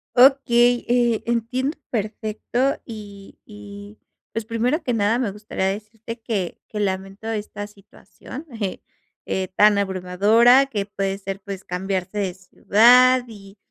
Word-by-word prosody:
Okey, 245 Hz, -2 st, +5 dB
eh, 240 Hz, -2 st, +2 dB
entiendo 245 Hz, +5 st, -1 dB
perfecto, 220 Hz, +4 st, -2 dB
y 205 Hz, -4 st, -11 dB
y, 205 Hz, 0 st, -11 dB, 0.3 s
pues, 225 Hz, -1 st, -4 dB
primero 245 Hz, +8 st, -1 dB
que 250 Hz, -5 st, -1 dB
nada 220 Hz, +1 st, +2 dB
me 235 Hz, -6 st, -1 dB
gustaría 205 Hz, -2 st, -4 dB
decirte 220 Hz, +3 st, -7 dB
que 200 Hz, -6 st, -3 dB
que 210 Hz, -, -6 dB
lamento 195 Hz, +2 st, -3 dB
esta 205 Hz, -1 st, -4 dB
situación, 210 Hz, -, -12 dB, 0.2 s
eh 195 Hz, -2 st, -3 dB, 0.4 s
eh, 190 Hz, -1 st, -2 dB
tan 210 Hz, -1 st, +5 dB
abrumadora, 200 Hz, +8 st, +4 dB
que 205 Hz, -6 st, -3 dB
puede 195 Hz, -1 st, -3 dB
ser 195 Hz, 0 st, -6 dB
pues 195 Hz, -2 st, -7 dB
cambiarse 185 Hz, +2 st, -3 dB
de 190 Hz, -3 st, -1 dB
ciudad 245 Hz, +7 st, +5 dB
y 200 Hz, -2 st, -13 dB
210 Hz, 130 wpm, -22 LUFS, 195-240 Hz, 0.4 s, Okey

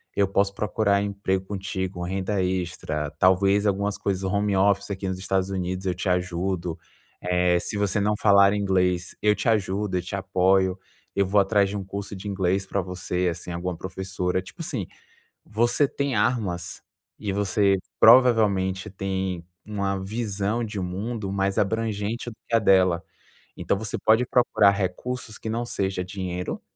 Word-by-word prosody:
eu 100 Hz, -, +3 dB
posso 100 Hz, +1 st, +1 dB
procurar 100 Hz, -1 st, +1 dB
emprego 100 Hz, -2 st, -1 dB
contigo, 95 Hz, -2 st, -4 dB
renda 95 Hz, +1 st, -1 dB
extra, 85 Hz, -5 st, -2 dB
talvez 95 Hz, +5 st, +3 dB
algumas 100 Hz, +1 st, 0 dB
coisas 95 Hz, -1 st, -2 dB
home 100 Hz, +1 st, 0 dB
office 100 Hz, +1 st, +2 dB
aqui 95 Hz, 0 st, -4 dB
nos 95 Hz, 0 st, -3 dB
Estados 95 Hz, 0 st, 0 dB
Unidos 95 Hz, 0 st, -3 dB
eu 90 Hz, -, 0 dB
te 95 Hz, +1 st, -2 dB
ajudo. 90 Hz, -1 st, -1 dB, 0.5 s
Eh, 90 Hz, 0 st, +2 dB
se 105 Hz, -, -4 dB
você 100 Hz, +1 st, +1 dB
não 105 Hz, +1 st, +2 dB
falar 100 Hz, -1 st, +6 dB
inglês, 90 Hz, -3 st, 0 dB
eu 105 Hz, 0 st, +4 dB
te -, -, -3 dB
ajudo, 100 Hz, -2 st, 0 dB
eu 90 Hz, -, 0 dB
te 90 Hz, -, -8 dB
apoio, 95 Hz, -1 st, +2 dB, 0.4 s
eu 100 Hz, -, +3 dB
vou 100 Hz, +2 st, +3 dB
atrás 100 Hz, 0 st, +2 dB
de 105 Hz, -, -3 dB
um 100 Hz, -, -4 dB
curso 100 Hz, +1 st, -6 dB
de 95 Hz, +2 st, -8 dB
inglês 95 Hz, -1 st, 0 dB
para 100 Hz, 0 st, -1 dB
você, 90 Hz, 0 st, -2 dB
assim, 85 Hz, +1 st, -7 dB
alguma 85 Hz, 0 st, -3 dB
professora.". 95 Hz, 0 st, -3 dB
Tipo 95 Hz, -1 st, -11 dB
assim, -, -, -3 dB, 0.6 s
você 120 Hz, +6 st, +2 dB
tem 140 Hz, -1 st, -2 dB
armas 105 Hz, -6 st, -1 dB, 0.4 s
e 105 Hz, -, -3 dB
você 100 Hz, 0 st, +2 dB, 0.2 s
provavelmente 105 Hz, -5 st, +5 dB
tem 95 Hz, -2 st, -3 dB, 0.2 s
uma 100 Hz, -2 st, -2 dB
visão 105 Hz, +1 st, -2 dB
de 105 Hz, -2 st, -4 dB
mundo 100 Hz, +3 st, -4 dB
mais 100 Hz, 0 st, 0 dB
abrangente 110 Hz, +2 st, -1 dB
do 110 Hz, -, -13 dB
que -, -, -2 dB
a -, -, +6 dB
dela. 95 Hz, -4 st, +4 dB, 0.5 s
Então -, -, 0 dB
você 110 Hz, +1 st, -4 dB
pode 110 Hz, +3 st, +4 dB
procurar 110 Hz, -5 st, +4 dB
recursos 110 Hz, +5 st, -3 dB
que 110 Hz, -, -5 dB
não 120 Hz, +2 st, -2 dB
seja 95 Hz, -4 st, -2 dB
dinheiro, 90 Hz, -1 st, -4 dB
95 Hz, 160 wpm, -25 LUFS, 95-105 Hz, 0.6 s, falar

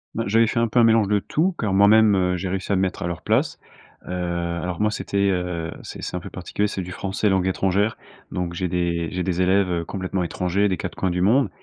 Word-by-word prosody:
Ben 115 Hz, -1 st, -2 dB
j'avais 115 Hz, +3 st, +4 dB
fait 115 Hz, -, 0 dB
un 115 Hz, -, +2 dB
peu 120 Hz, +2 st, +1 dB
un -, -, +6 dB
mélange 115 Hz, -2 st, +4 dB
de 105 Hz, 0 st, +2 dB
tout, 175 Hz, -, 0 dB
car 105 Hz, -4 st, -1 dB
moi-même, 105 Hz, +1 st, +6 dB
heu, 90 Hz, -1 st, +1 dB
j'ai 90 Hz, +1 st, -3 dB
réussi 95 Hz, +1 st, -3 dB
à -, -, +3 dB
me 95 Hz, -, +1 dB
mettre 95 Hz, -1 st, -2 dB
à -, -, -1 dB
leur 85 Hz, -, -4 dB
place. -, -, 0 dB, 0.5 s
Heu, -, -, -6 dB
alors 85 Hz, 0 st, -3 dB
moi, 105 Hz, 0 st, +2 dB
c'était, 100 Hz, -1 st, 0 dB
heu, 90 Hz, -3 st, -2 dB
c'est -, -, -8 dB
c'est -, -, -4 dB
un -, -, -3 dB
peu -, -, -9 dB
particulier. 105 Hz, +1 st, -2 dB
C'est 95 Hz, -, -4 dB
du 90 Hz, 0 st, -7 dB
français 100 Hz, +3 st, -1 dB
langue 95 Hz, -1 st, +2 dB
étrangère. 100 Hz, +3 st, +1 dB, 0.3 s
Donc 85 Hz, -1 st, -3 dB
j'ai 90 Hz, 0 st, -2 dB
des 85 Hz, -1 st, -1 dB
j'ai 90 Hz, 0 st, -2 dB
des 90 Hz, -1 st, -1 dB
élèves, 95 Hz, 0 st, +3 dB
heu, 85 Hz, -1 st, -1 dB
complètement 95 Hz, -1 st, -3 dB
étrangers, 90 Hz, +4 st, 0 dB
des 95 Hz, -, 0 dB
4 -, -, -6 dB
coins 95 Hz, -, -1 dB
du 90 Hz, +1 st, -1 dB
monde. 125 Hz, +8 st, +3 dB
95 Hz, 255 wpm, -23 LUFS, 90-105 Hz, 0.5 s, un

